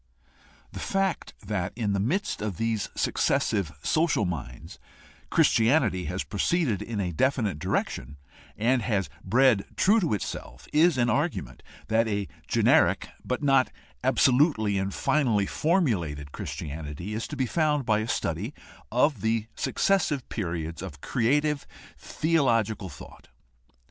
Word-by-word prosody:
The -, -, -7 dB
fact 195 Hz, -2 st, -1 dB
that 95 Hz, -3 st, -2 dB
in 110 Hz, -4 st, -1 dB
the 100 Hz, -, 0 dB
midst 185 Hz, -, -1 dB
of 105 Hz, -5 st, -3 dB
these 115 Hz, -2 st, -1 dB
successive 95 Hz, -7 st, +1 dB
social 160 Hz, -9 st, +2 dB
minds 65 Hz, -8 st, -6 dB, 0.5 s
Christianity 115 Hz, -, +3 dB
has 90 Hz, +2 st, -2 dB
proceeded 120 Hz, -, 0 dB
in 115 Hz, -3 st, -4 dB
a 90 Hz, -3 st, -1 dB
definite 110 Hz, -, +1 dB
direction, 70 Hz, -1 st, -2 dB, 0.4 s
and 120 Hz, +3 st, +2 dB
has 100 Hz, -, -1 dB
bred 125 Hz, -4 st, +4 dB
true 210 Hz, +4 st, +4 dB
to 165 Hz, -, +1 dB
itself, 100 Hz, -, -6 dB
is 160 Hz, 0 st, +4 dB
an 120 Hz, -1 st, +2 dB
argument 150 Hz, +5 st, -2 dB, 0.3 s
that 115 Hz, +1 st, +2 dB
a 100 Hz, -2 st, -1 dB, 0.2 s
generic -, -, +3 dB
but 125 Hz, +3 st, -3 dB
not 135 Hz, -2 st, +4 dB, 0.3 s
absolutely 125 Hz, -, +3 dB
and 95 Hz, +1 st, -2 dB
finally 115 Hz, -5 st, +1 dB
formulated 95 Hz, -, 0 dB
Christianity 75 Hz, +8 st, -6 dB
is 110 Hz, +2 st, -3 dB
to 150 Hz, -, -6 dB
be 130 Hz, -2 st, 0 dB
found 150 Hz, 0 st, +1 dB
by 110 Hz, -2 st, +2 dB
a 110 Hz, -, -3 dB
study 100 Hz, -, -2 dB, 0.4 s
of 125 Hz, -1 st, +2 dB
the 110 Hz, 0 st, 0 dB
successive 160 Hz, -, 0 dB
periods 85 Hz, -6 st, -4 dB
of 70 Hz, -1 st, -8 dB
creative 145 Hz, +5 st, +1 dB, 0.3 s
theological 115 Hz, -, +1 dB
thought. 70 Hz, -, -13 dB
115 Hz, 130 wpm, -27 LUFS, 95-140 Hz, 0.5 s, bred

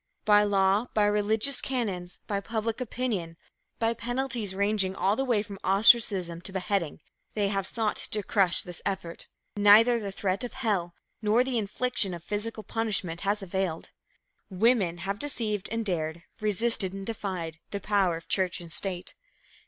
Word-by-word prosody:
By 210 Hz, -1 st, +6 dB
law, 200 Hz, +2 st, +2 dB
by 210 Hz, -, +4 dB
religious 210 Hz, +6 st, +2 dB
canons, 195 Hz, -9 st, -3 dB
by 200 Hz, -1 st, -1 dB
public 225 Hz, +2 st, -3 dB
opinion, 215 Hz, -9 st, -3 dB, 0.4 s
by 225 Hz, 0 st, +1 dB
penalties 240 Hz, -3 st, -3 dB
ranging 200 Hz, -1 st, +1 dB
all 195 Hz, +2 st, +2 dB
the 270 Hz, -, 0 dB
way 235 Hz, -6 st, +1 dB
from 200 Hz, -2 st, -9 dB
ostracism 195 Hz, -4 st, +4 dB
to 190 Hz, -, -5 dB
beheading, 190 Hz, -4 st, -2 dB, 0.3 s
they 205 Hz, -2 st, +1 dB
have 195 Hz, -1 st, -1 dB
sought 220 Hz, -3 st, -1 dB
to 210 Hz, -1 st, -2 dB
crush 190 Hz, -3 st, +2 dB
this 175 Hz, -2 st, -7 dB
effort. 185 Hz, -4 st, -4 dB, 0.3 s
Neither 210 Hz, +2 st, +6 dB
threat 195 Hz, +2 st, -2 dB
of 245 Hz, -, -5 dB
hell 200 Hz, -9 st, -1 dB, 0.3 s
nor 220 Hz, +3 st, +3 dB
the 255 Hz, -2 st, 0 dB
infliction 205 Hz, -2 st, 0 dB
of 170 Hz, -, -10 dB
physical 215 Hz, +3 st, -4 dB
punishment 200 Hz, -6 st, -2 dB
has 205 Hz, +1 st, 0 dB
availed. 190 Hz, -3 st, -3 dB, 0.6 s
Women 195 Hz, -3 st, +2 dB
have 200 Hz, +1 st, -2 dB
deceived 215 Hz, -8 st, -1 dB
and 225 Hz, 0 st, -2 dB
dared, 170 Hz, -3 st, -2 dB, 0.2 s
resisted 215 Hz, -2 st, +1 dB
and 195 Hz, 0 st, -6 dB
defied 185 Hz, -7 st, -4 dB
the 200 Hz, -, -4 dB
power 195 Hz, -4 st, +1 dB
of 165 Hz, -, -13 dB
church 185 Hz, -1 st, +1 dB
and 170 Hz, -1 st, -10 dB
state. 180 Hz, +1 st, -2 dB
205 Hz, 155 wpm, -28 LUFS, 185-225 Hz, 0.6 s, By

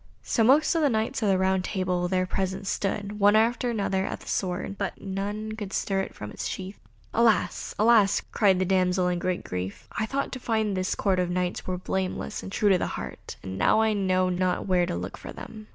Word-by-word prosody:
So 230 Hz, -, +1 dB
most 280 Hz, +7 st, +5 dB
of 330 Hz, -, +1 dB
the 290 Hz, -, +4 dB
Knights 220 Hz, 0 st, -1 dB
of 210 Hz, -, +2 dB
the 190 Hz, -, +4 dB
Round 190 Hz, 0 st, +2 dB
Table 180 Hz, -2 st, -1 dB
there 185 Hz, 0 st, +1 dB
present 190 Hz, +1 st, -2 dB, 0.2 s
pulled, 205 Hz, +1 st, -2 dB
one 205 Hz, +1 st, +5 dB
after 235 Hz, +3 st, +2 dB
another, 200 Hz, -4 st, 0 dB
at -, -, -4 dB
the -, -, -14 dB
sword, 185 Hz, +1 st, -2 dB
but -, -, -4 dB
none 205 Hz, +3 st, -4 dB
could 210 Hz, -3 st, -6 dB
stir 195 Hz, -1 st, 0 dB
it -, -, -6 dB
from 105 Hz, 0 st, -7 dB
its -, -, -4 dB
sheath. 190 Hz, +1 st, -6 dB, 0.3 s
"Alas! 230 Hz, -2 st, +2 dB
alas!" 215 Hz, -2 st, +5 dB
cried 195 Hz, -4 st, +4 dB
the 185 Hz, -, +1 dB
damsel 185 Hz, -1 st, +2 dB
in 175 Hz, -1 st, -1 dB
great 180 Hz, 0 st, -1 dB
grief, 90 Hz, +1 st, -5 dB
"I 220 Hz, -, -2 dB
thought 275 Hz, +2 st, -2 dB
to 255 Hz, -, -5 dB
find 220 Hz, -3 st, 0 dB
in -, -, -1 dB
this 185 Hz, 0 st, -1 dB
Court 190 Hz, -3 st, +1 dB
Knights 180 Hz, 0 st, -1 dB
that -, -, -17 dB
were 180 Hz, -, -1 dB
blameless 185 Hz, +1 st, -3 dB
and 190 Hz, -, -8 dB
true 205 Hz, -1 st, +3 dB
of 180 Hz, -, +2 dB
heart, -, -, -5 dB
and 95 Hz, 0 st, -5 dB
now 220 Hz, -, +4 dB
I 220 Hz, -1 st, +3 dB
know 185 Hz, -2 st, +1 dB
not 180 Hz, 0 st, 0 dB
where 180 Hz, -2 st, +2 dB
to -, -, -2 dB
look 90 Hz, +2 st, -5 dB
for -, -, -8 dB
them." 215 Hz, -1 st, -10 dB
195 Hz, 225 wpm, -26 LUFS, 185-215 Hz, 0.3 s, most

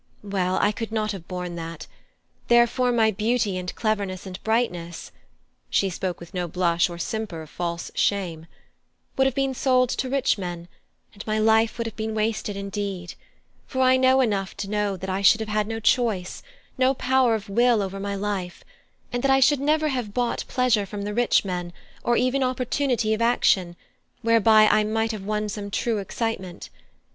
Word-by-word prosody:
Well, 190 Hz, -2 st, -1 dB
I 205 Hz, -, +3 dB
could 220 Hz, +1 st, -5 dB
not 215 Hz, -1 st, -1 dB
have 190 Hz, -5 st, -8 dB
borne 180 Hz, -1 st, -5 dB
that; 165 Hz, -1 st, -7 dB, 0.6 s
therefore 240 Hz, +1 st, +4 dB
my 225 Hz, -2 st, +3 dB
beauty 215 Hz, 0 st, 0 dB
and 180 Hz, -1 st, -5 dB
cleverness 200 Hz, -4 st, -2 dB
and 185 Hz, -1 st, -8 dB
brightness" 180 Hz, -7 st, -2 dB, 0.6 s
(she 195 Hz, -1 st, +1 dB
spoke 180 Hz, 0 st, -3 dB
with 170 Hz, +2 st, -12 dB
no 180 Hz, -1 st, -2 dB
blush 175 Hz, 0 st, +1 dB
or 170 Hz, -, -7 dB
simper 190 Hz, -4 st, -4 dB
of 155 Hz, -, -15 dB
false 170 Hz, -1 st, -4 dB
shame) 170 Hz, -5 st, -1 dB, 0.7 s
"would 265 Hz, 0 st, +3 dB
have 265 Hz, -, -2 dB
been 270 Hz, -1 st, 0 dB
sold 255 Hz, -1 st, +2 dB
to 260 Hz, -, -2 dB
rich 270 Hz, -5 st, +1 dB
men, 175 Hz, -2 st, -5 dB, 0.5 s
and 205 Hz, 0 st, -11 dB
my 215 Hz, 0 st, 0 dB
life 220 Hz, +1 st, +3 dB
would 230 Hz, -, -2 dB
have 225 Hz, -, -5 dB
been 220 Hz, 0 st, -3 dB
wasted 215 Hz, -2 st, -1 dB
indeed; 195 Hz, -3 st, -4 dB, 0.5 s
for 260 Hz, -, -2 dB
I 255 Hz, 0 st, +5 dB
know 260 Hz, 0 st, +4 dB
enough 200 Hz, -6 st, 0 dB
of -, -, -33 dB
that 200 Hz, -, -3 dB
to 195 Hz, -, -8 dB
know 210 Hz, -2 st, 0 dB
that 190 Hz, -, -6 dB
I 190 Hz, +1 st, -1 dB
should 205 Hz, +3 st, +6 dB
have 220 Hz, -1 st, -4 dB
had 210 Hz, 0 st, 0 dB
no 225 Hz, 0 st, -3 dB
choice, 215 Hz, -5 st, +1 dB, 0.4 s
no 260 Hz, +1 st, +3 dB
power 255 Hz, -2 st, +2 dB
of 215 Hz, -2 st, -6 dB
will 230 Hz, +1 st, +3 dB
over 195 Hz, 0 st, -5 dB
my 200 Hz, 0 st, -3 dB
life; 195 Hz, -3 st, -4 dB, 0.5 s
and 245 Hz, -, -1 dB
that 275 Hz, -, +1 dB
I 270 Hz, 0 st, +5 dB
should 270 Hz, +2 st, +4 dB
never 305 Hz, +2 st, +2 dB
have 245 Hz, -7 st, -3 dB
bought 245 Hz, -1 st, -1 dB
pleasure 240 Hz, -6 st, +1 dB
from 200 Hz, +1 st, -6 dB
the 205 Hz, +1 st, -3 dB
rich 240 Hz, -2 st, +2 dB
men, 175 Hz, -2 st, -4 dB, 0.3 s
or 240 Hz, -, +2 dB
even 255 Hz, +2 st, +1 dB
opportunity 255 Hz, -2 st, 0 dB
of 220 Hz, -, -2 dB
action, 190 Hz, -7 st, +2 dB, 0.5 s
whereby 225 Hz, -1 st, +5 dB
I 215 Hz, 0 st, +4 dB
might 225 Hz, +1 st, 0 dB
have 210 Hz, -3 st, -6 dB
won 210 Hz, 0 st, -1 dB
some 205 Hz, 0 st, -5 dB
true 220 Hz, +2 st, -1 dB
excitement. 195 Hz, -3 st, -4 dB
215 Hz, 190 wpm, -24 LUFS, 190-240 Hz, 0.7 s, should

